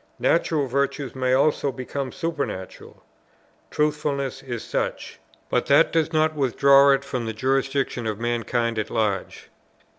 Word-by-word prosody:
Natural 160 -3 +1
virtues 140 +1 -2
may 130 -1 0
also 140 +1 +2
become 130 +2 -5
supernatural; 145 - -5 0.7
Truthfulness 150 -3 -1
is 120 -3 -6
such; - - -4 0.3
but - - 0
that - - +5
does 160 -1 +1
not 155 -1 +2
withdraw 140 0 +5
it 135 0 +3
from 125 -4 -3
the 110 - -3
jurisdiction 135 0 -1
of 110 -1 -3
mankind 120 -1 -1
at 105 - -3
large. 105 -4 -2
135 Hz, 130 wpm, -23 LUFS, 120-145 Hz, 0.7 s, that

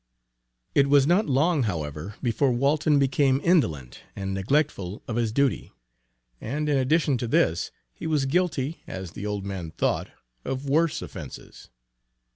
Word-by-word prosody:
It 140 -1 +4
was 140 -1 +5
not 175 +7 +3
long, 150 +3 +2
however, 80 - -3
before 125 +3 +2
Walton 145 +4 +2
became 135 0 +3
indolent 80 - +1 0.2
and 95 -1 -3
neglectful 100 - -1
of 115 - -3
his 115 -2 0
duty; 140 +3 0 0.7
and 150 +6 -2
in 145 - +2
addition 135 0 +2
to 120 - -2
this, 85 -6 +2 0.2
he - - -6
was 150 -4 +1
guilty, 155 -1 0
as 95 -2 -6
the 105 - -6
old 100 -1 -3
man 95 -4 -5
thought, 80 - -1 0.3
of 135 +1 -4
worse 155 +3 +1
offences. - - -10
135 Hz, 145 wpm, -26 LUFS, 100-150 Hz, 0.7 s, was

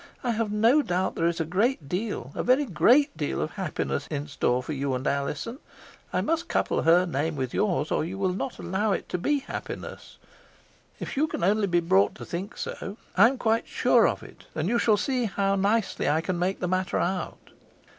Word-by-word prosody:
I 245 - +1
have 225 -2 -1
no 230 +8 +4
doubt 185 -6 -1
there 165 - +1
is 170 0 -1
a 165 - 0
great 185 - 0
deal, 180 - -3
a - - -2
very 260 +4 +3
great 265 - +4
deal, 150 - -2
of 155 - -2
happiness 175 -6 -3
in 145 -2 -3
store 125 -3 0
for 155 - -4
you 135 -1 -1
and 125 +2 -4
Alizon 145 - -2 0.5
I - - +1
must 330 +2 -1
couple - - 0
her 170 +3 +5
name 160 -1 -1
with 130 -3 -3
yours, 170 -8 0
or - - +1
you 180 +4 -5
will 190 -2 0
not 215 +6 -4
allow 200 +3 0
it - - -3
to 180 - -2
be 285 +9 +1
happiness - - -7 0.8
if - - -5
you 300 +3 +2
can 295 - -4
only 205 +2 +3
be 175 -1 +2
brought 100 - +3
to 120 - -9
think 180 - -5
so. 200 +2 -5 0.2
I 200 +5 +8
am 265 +2 -1
quite 225 -1 +1
sure - - +4
of - - -2
it; - - -14
and 155 +2 -1
you 235 +3 +2
shall 215 -3 +3
see 250 +3 0
how 195 -1 0
nicely 200 -3 +1
I 150 +2 +3
can 175 +1 -2
make 185 +2 -1
the 180 - 0
matter 185 +1 0
out. 180 0 -3
190 Hz, 215 wpm, -26 LUFS, 160-225 Hz, 0.8 s, I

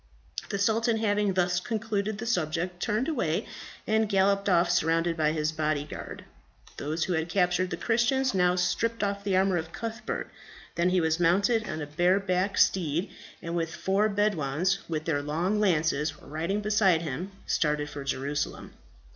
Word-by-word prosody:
The 200 - -2
sultan 225 +3 +2
having 205 -2 +1
thus 180 -1 +2
concluded 215 -1 -2
the 220 - -5
subject, 175 -4 -1
turned 230 +3 0
away, 235 - -1 0.4
and 220 0 +1
galloped 200 0 +2
off 175 -1 +3
surrounded 165 +1 +1
by 155 -2 +2
his 155 0 0
body 155 -2 -1
guard. 150 - -8 0.5
Those 155 +3 -2
who 185 - -1
had 160 +1 -1
captured 180 0 +1
the 175 - -4
Christians 245 +3 +1
now 180 -1 +3
stripped 210 +6 0
off 200 0 -2
the 195 -2 +1
armour 190 -1 +3
of 160 0 -4
Cuthbert; 225 +2 -5 0.4
then 170 +1 +1
he 185 0 +2
was 160 0 +1
mounted 205 +6 +2
on 155 0 -3
a - - -3
bare 175 +6 +2
backed 195 +1 -1
steed, 170 -1 +2 0.3
and 170 +1 -4
with 165 0 -2
four 195 +5 +1
Bedouins, 190 -3 0
with 155 -1 -2
their 145 -3 0
long 170 +8 -1
lances, 160 -5 +1
riding 165 +8 -3
beside 200 -5 +3
him, 165 +5 -4 0.2
started 150 -1 0
for 145 -1 -7
Jerusalem. 140 +1 -3
180 Hz, 165 wpm, -28 LUFS, 160-205 Hz, 0.5 s, off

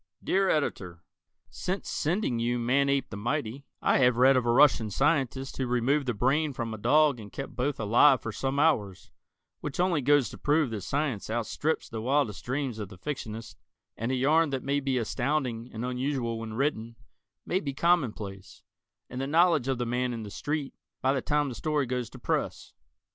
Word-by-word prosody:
_ - - -20
Dear 195 0 +2
Editor: 90 - -2 0.5
Since 190 +2 -4
sending 155 - -1
you 120 +1 0
"Manape 140 +3 +1
the 100 - -5
Mighty," 125 +3 -3 0.2
I - - +3
have 125 -2 +4
read 130 +2 +6
of 125 -2 +1
a - - +4
Russian 125 -4 +5
scientist 135 - 0
who 130 - -1
removed 130 +4 +1
the 120 - 0
brain 140 +6 +1
from 115 -2 -4
a 110 - -7
dog 150 +2 +3
and 105 -2 -10
kept 135 - -7
both 135 +3 -1
alive 120 +5 +5
for 115 - -5
some 135 +5 -2
hours, 105 - +1 0.5
which 150 +3 -6
only 175 -4 +2
goes 145 -1 +4
to - - -11
prove 150 -3 +2
that 110 -3 -4
science 135 -2 -2
outstrips 120 +7 -1
the 110 -1 -5
wildest 130 -4 0
dreams 130 -3 -3
of 105 -3 -5
the 95 - -12
fictionist, 115 -2 -6 0.4
and 115 +3 -3
a - - +1
yarn 150 +5 +3
that 135 -2 -3
may 140 +1 0
be 135 -2 -1
astounding 125 0 -1
and 110 +2 -5
unusual 125 -2 -2
when 110 -1 -6
written, 115 -4 -1 0.5
may 185 - 0
be 145 -6 -4
commonplace, 130 - -1 0.4
and 125 +1 -5
the 135 - -2
knowledge 160 -3 +3
of 135 -1 0
the 120 - -2
man 125 +1 -1
in 115 -1 -5
the 105 - -8
street, 145 +2 -3 0.3
by 135 +1 +3
the 135 - -1
time 150 0 +1
the 130 - -4
story 145 +7 -1
goes 125 -2 -3
to - - -12
press. - - -3
130 Hz, 195 wpm, -28 LUFS, 115-145 Hz, 0.5 s, read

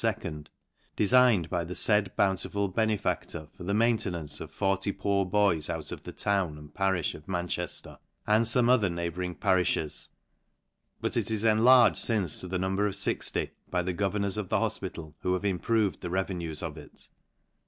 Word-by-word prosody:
de 105 - +1
signed 120 -6 +4
by 85 +1 -1
the 90 +2 -6
faid 105 -3 +3
bountiful 100 +1 +1
benefactor 100 -6 -1
for - - -10
the 100 - -2
main 115 +1 +3
tenance, 85 -8 -3
of - - -7
40 95 0 0
poor 100 -1 0
boys 90 -6 +2
out - - -4
of - - -7
the - - -8
town 95 -7 -1
and 75 -1 -13
parifh 95 -5 0
of 75 - -12
Manchefter, 90 -1 -3 0.3
and 110 +2 +3
fome 120 +1 +3
other 120 -6 +4
neighbouring 85 +1 -3
parifhes; 90 -4 0 0.9
but - - -1
it - - +1
is 110 -1 +2
enlarged 115 +3 +5
fince 100 -9 +1
to 95 - -5
the 90 +1 -2
number 95 +3 0
of 100 - -3
60, 100 - -1 0.2
by 90 -1 0
the 90 +1 -2
governors 100 +1 -1
of 105 -4 -4
the - - +2
hofpital, 80 -2 -4
who 90 - 0
have 90 +2 -2
im 95 -3 0
proved 110 -3 0
the 90 - -4
revenues 90 -4 -3
of 80 -1 -5
it. 75 - -13
95 Hz, 175 wpm, -28 LUFS, 90-105 Hz, 0.9 s, enlarged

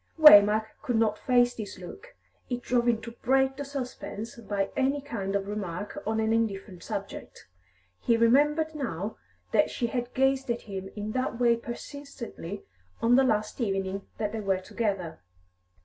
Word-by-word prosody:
Waymark 215 -8 +9 0.2
could 245 - -1
not 220 -1 +2
face 245 -1 +3
this 210 -3 -7
look; 400 - -11 0.3
it 245 -1 -3
drove 245 -1 +1
him 235 -2 +3
to 235 - -7
break 265 +1 +3
the 285 - -4
suspense 250 -5 -6
by 205 -4 -2
any 275 +2 +1
kind 205 -9 -4
of 200 0 -1
remark 205 - -4
on 220 0 0
an 220 0 +2
indifferent 195 -5 -2
subject. - - -7 0.5
He 235 - +2
remembered 295 +7 +3
now 220 - -4 0.3
that - - +3
she 240 - -2
had 245 +1 -3
gazed 270 0 +2
at 235 0 -1
him 195 -2 -6
in 210 0 -4
that 255 0 -2
way 235 -1 +5
persistently 235 - -7 0.4
on 235 +2 +4
the 270 - +6
last 215 -1 0
evening 195 -2 -2
that 210 -2 -1
they 225 - -4
were 195 -2 +1
together. 190 - -3
230 Hz, 165 wpm, -28 LUFS, 205-260 Hz, 0.5 s, Waymark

